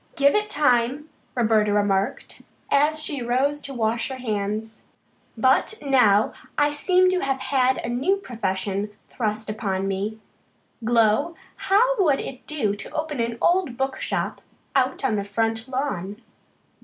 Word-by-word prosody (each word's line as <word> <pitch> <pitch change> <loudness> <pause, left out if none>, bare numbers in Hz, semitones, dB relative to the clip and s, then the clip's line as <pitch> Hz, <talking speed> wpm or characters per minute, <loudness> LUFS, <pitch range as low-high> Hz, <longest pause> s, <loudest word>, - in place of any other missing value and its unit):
"Give 280 0 +4
it 425 0 +1
time," 275 - +1 0.3
Roberta 220 -3 +3
remarked 200 -1 0 0.3
as 300 +2 +3
she 285 -4 -3
rose 265 +5 0
to 280 - -7
wash 230 +1 0
her 265 - -5
hands. 215 -2 -3 0.5
"But 260 - +3
now 220 -7 +4 0.2
I 290 0 +3
seem 365 +5 +3
to 370 - +1
have 270 -4 -1
had 260 -1 +2
a - - -4
new 260 +11 +1
profession 200 - -3 0.2
thrust 220 -2 -2
upon 195 -3 -2
me. 200 +3 -2 0.7
Glow, 230 +7 +2 0.2
how 485 +6 +2
would 290 -6 +3
it 255 - -7
do 235 -10 0
to 205 - -8
open 305 -3 -3
an 230 0 -1
old 345 -9 +2
book 265 0 -2
shop - - -2 0.3
out 265 0 +1
on 220 -5 +1
the 200 - -1
front 225 +3 -1
lawn?" 225 -7 -3
245 Hz, 145 wpm, -24 LUFS, 215-285 Hz, 0.7 s, Give